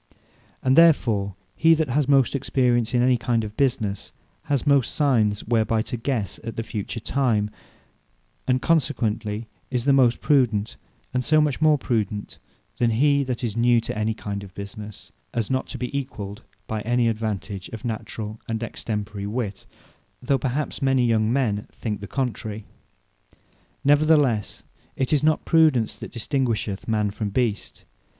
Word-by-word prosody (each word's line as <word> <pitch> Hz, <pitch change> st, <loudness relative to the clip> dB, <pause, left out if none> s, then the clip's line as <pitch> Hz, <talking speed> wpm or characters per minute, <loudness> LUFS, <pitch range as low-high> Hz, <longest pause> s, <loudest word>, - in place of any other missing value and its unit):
And 130 Hz, 0 st, +3 dB
therefore 115 Hz, -, +4 dB, 0.2 s
he 165 Hz, 0 st, +5 dB
that 155 Hz, -3 st, -1 dB
has 140 Hz, +2 st, +1 dB
most 135 Hz, -3 st, +4 dB
experience 125 Hz, -3 st, +1 dB
in 120 Hz, -, +4 dB
any 125 Hz, 0 st, +4 dB
kind 115 Hz, 0 st, 0 dB
of 105 Hz, 0 st, -7 dB
businesse, 110 Hz, -7 st, -1 dB, 0.3 s
has 140 Hz, -2 st, 0 dB
most 140 Hz, -4 st, +3 dB
Signes, 115 Hz, -9 st, +2 dB
whereby 110 Hz, -1 st, +1 dB
to 125 Hz, -, -4 dB
guesse 115 Hz, -4 st, -2 dB
at 115 Hz, 0 st, -6 dB
the 115 Hz, -, -2 dB
Future 110 Hz, +1 st, -5 dB
time, 110 Hz, -4 st, 0 dB, 1.0 s
and 130 Hz, 0 st, +1 dB
consequently 115 Hz, -8 st, 0 dB, 0.2 s
is 125 Hz, -2 st, -2 dB
the 140 Hz, -, +5 dB
most 125 Hz, -3 st, +4 dB
prudent: 115 Hz, -7 st, +2 dB, 0.4 s
And 125 Hz, 0 st, 0 dB
so 155 Hz, +4 st, +4 dB
much 150 Hz, -1 st, +1 dB
more 155 Hz, -1 st, +5 dB
prudent 105 Hz, -6 st, -2 dB, 0.4 s
than 120 Hz, -, +3 dB
he 140 Hz, +5 st, +3 dB
that 125 Hz, -1 st, -3 dB
is 110 Hz, -3 st, -2 dB
new 120 Hz, 0 st, +4 dB
in 110 Hz, 0 st, -1 dB
that 110 Hz, 0 st, -1 dB
kind 100 Hz, -1 st, -5 dB
of 95 Hz, -2 st, -12 dB
business, 105 Hz, +1 st, -9 dB, 0.2 s
as 115 Hz, -1 st, -1 dB
not 130 Hz, 0 st, 0 dB
to 130 Hz, -, -7 dB
be 125 Hz, +2 st, -4 dB
equalled 105 Hz, -7 st, -5 dB, 0.2 s
by 110 Hz, -1 st, -3 dB
any 120 Hz, +2 st, +1 dB
advantage 105 Hz, -4 st, -3 dB
of 115 Hz, +1 st, -8 dB
naturall 110 Hz, -1 st, -5 dB
and 115 Hz, 0 st, -2 dB
extemporary 105 Hz, -2 st, -4 dB
wit: 105 Hz, -3 st, -4 dB, 0.5 s
though 135 Hz, +2 st, +1 dB
perhaps 135 Hz, +4 st, -2 dB
many 135 Hz, -2 st, +3 dB
young 110 Hz, -1 st, +2 dB
men 115 Hz, -6 st, 0 dB
think 105 Hz, -3 st, -4 dB
the 100 Hz, -, -6 dB
contrary. 110 Hz, -5 st, -3 dB, 1.2 s
Neverthelesse 145 Hz, -6 st, +3 dB, 0.3 s
it 130 Hz, +2 st, -1 dB
is 145 Hz, -, +3 dB
not 155 Hz, 0 st, +2 dB
Prudence 155 Hz, -9 st, +3 dB
that -, -, -8 dB
distinguisheth 115 Hz, -5 st, -2 dB
man 105 Hz, -2 st, +1 dB
from 105 Hz, 0 st, -3 dB
beast. 110 Hz, -1 st, -2 dB
115 Hz, 155 wpm, -24 LUFS, 105-135 Hz, 1.2 s, he